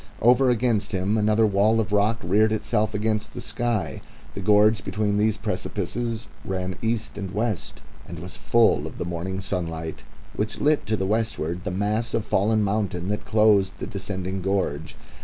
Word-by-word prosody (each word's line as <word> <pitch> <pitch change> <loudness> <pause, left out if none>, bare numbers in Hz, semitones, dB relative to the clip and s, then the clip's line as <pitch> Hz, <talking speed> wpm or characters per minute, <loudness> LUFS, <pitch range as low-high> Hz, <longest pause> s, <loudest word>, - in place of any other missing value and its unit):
Over 125 +3 +5
against 115 -4 +1
him 95 +3 +1
another 110 +1 +3
wall 105 +2 +3
of 110 -2 -1
rock 105 +2 +3
reared 105 +5 +3
itself 110 0 0
against 110 0 -1
the - - -5
sky. 120 -4 -2 0.3
The - - -5
gorge 105 0 +4
between 105 +1 0
these 110 0 +2
precipices 115 +2 -3 0.2
ran 95 -1 -3
east 110 -1 -2
and 100 -2 -4
west 105 +1 -3 0.2
and 85 - -7
was 90 +3 -7
full 115 -1 +3
of - - -9
the - - -3
morning 85 +3 -3
sunlight, 80 -4 -4 0.3
which 105 +1 -2
lit 150 0 +2
to 110 +1 +1
the 95 - -1
westward 105 -5 -1
the - - -1
mass 105 +5 -1
of 115 - -1
fallen 110 +2 +2
mountain 100 -3 -1
that 105 0 -2
closed 105 -2 +4
the - - -5
descending 95 -2 -4
gorge. 95 -6 -1
105 Hz, 170 wpm, -24 LUFS, 95-110 Hz, 0.3 s, Over